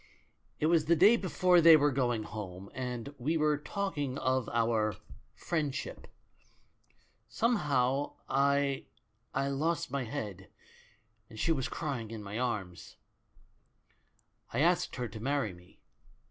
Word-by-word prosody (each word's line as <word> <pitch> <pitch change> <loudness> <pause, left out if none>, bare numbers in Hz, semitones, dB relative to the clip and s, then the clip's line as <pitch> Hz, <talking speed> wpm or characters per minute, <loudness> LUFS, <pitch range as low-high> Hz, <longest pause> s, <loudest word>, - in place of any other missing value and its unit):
"It - - +1
was 160 -1 +3
the 170 +2 +4
day 200 +8 +7
before 180 -3 +3
they 165 -1 +9
were 145 -1 +3
going 120 -4 0
home, 100 -3 -8
and 125 +1 -5
we 155 +7 0
were 150 -1 +2
talk 195 +1 -3
ing 140 -2 -2
of 130 -1 0
our 115 -3 +1 0.4
'friendship.' 155 -5 -3 1.2
Somehow 140 - +1
I 140 0 +1 0.3
— 110 +2 -45
I - - -1
lost 155 +4 -1
my 140 -2 -2
head, 100 -5 -6 0.8
and 110 -2 -11
she 165 - +1
was 135 -6 0
crying 135 -8 -4
in 110 -2 -7
my 100 +3 -5
arms. 100 -8 -4 1.6
"I - - 0
asked 175 +2 +2
her 125 -2 -3
to 110 0 -9
marry 130 -4 -1
me. 90 +1 -19
135 Hz, 135 wpm, -31 LUFS, 115-155 Hz, 1.6 s, they